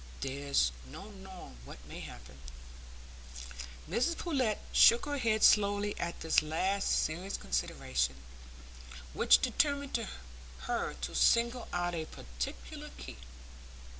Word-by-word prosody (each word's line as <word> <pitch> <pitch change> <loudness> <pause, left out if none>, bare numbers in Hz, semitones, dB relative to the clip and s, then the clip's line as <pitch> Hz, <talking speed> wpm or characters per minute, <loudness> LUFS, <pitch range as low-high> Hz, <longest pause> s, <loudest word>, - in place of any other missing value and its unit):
There's 135 - +1 0.2
no 205 - -9
knowing 190 - -11
what - - -10
may - - -8
happen." 65 +2 -10 1.5
Mrs 250 - 0
Pullet 260 - 0 0.2
shook 235 - +7
her 290 -1 -2
head 220 -3 +1
slowly 205 0 +4
at 170 0 -3
this 160 0 +4
last 185 +6 0 0.2
serious 180 +5 -3
consideration, 65 +1 -1 1.0
which 60 - +6
determined 280 - 0 0.6
her - - -2
to 65 - -4
single 235 +1 +3
out 175 0 -1
a 160 -2 -2
particular - - -7
key. 60 -1 -9
185 Hz, 110 wpm, -32 LUFS, -, 1.5 s, shook